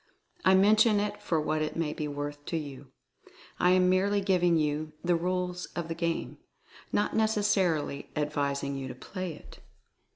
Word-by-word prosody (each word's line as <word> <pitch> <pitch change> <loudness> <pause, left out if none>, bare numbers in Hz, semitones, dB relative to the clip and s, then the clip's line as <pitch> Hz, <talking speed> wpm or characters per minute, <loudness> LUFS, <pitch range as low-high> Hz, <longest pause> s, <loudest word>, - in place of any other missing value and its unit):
I 190 - +6
mention 210 +2 +5
it 205 0 -3
for 170 -6 0
what 155 0 0
it 155 - -2
may 160 -2 -1
be 150 - -3
worth 145 0 -5
to 165 - -2
you. 140 -3 -7 0.7
I 180 - +4
am 185 0 +5
merely 195 +2 +3
giving 180 -3 +3
you 155 0 -1
the 175 0 +2
"rules 180 +1 -2
of 170 -1 -3
the - - -1
game," 170 0 -3 0.5
not 205 - 0
necessarily 205 -9 +1
advising 140 -2 -1
you 135 -1 -4
to 125 - -7
play 185 +4 -6
it. - - -15
170 Hz, 165 wpm, -29 LUFS, 150-190 Hz, 0.7 s, I